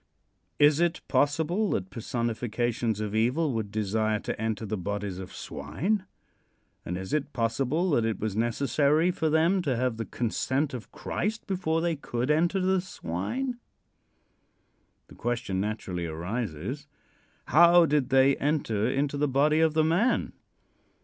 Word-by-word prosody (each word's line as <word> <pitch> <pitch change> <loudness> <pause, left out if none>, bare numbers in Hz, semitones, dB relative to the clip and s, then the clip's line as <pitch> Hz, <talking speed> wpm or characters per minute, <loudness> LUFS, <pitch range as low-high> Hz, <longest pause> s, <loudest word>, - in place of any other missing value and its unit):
Is 145 +1 +5
it 170 -1 +1
possible 160 +9 +1
that 95 0 -2
personifications 115 0 -2
of 105 -1 -3
evil 125 +7 +1
would 110 -3 -2
desire 110 +1 0
to - - -4
enter 110 -1 -2
the 110 +1 -2
bodies 100 0 -4
of 95 0 -8
swine, 175 - -3 0.8
and 90 - -4
is 95 0 -6
it 150 -1 -1
possible 135 +9 0
that 120 -6 +3
it 110 -1 -1
was 105 -2 -2
necessary 140 +8 +2
for 160 -2 -1
them 165 +5 +3
to 140 -7 0
have 125 -1 -1
the 115 - -3
consent 130 +5 -1
of 125 -3 -7
Christ 220 +4 -3
before 180 -5 0
they 170 -1 0
could 125 -1 -2
enter 170 +5 +2
the 190 0 +2
swine? 190 - -4 1.5
The - - -15
question 120 -6 -2
naturally 95 -5 -3
arises: 100 - -4 0.6
How 170 +3 +7
did 145 -4 +1
they 135 +1 +5
enter 125 -7 0
into 140 +2 0
the 145 +1 +1
body 145 +3 +3
of 160 -1 +3
the 160 - +4
man? 175 +11 +1
130 Hz, 145 wpm, -27 LUFS, 110-160 Hz, 1.5 s, How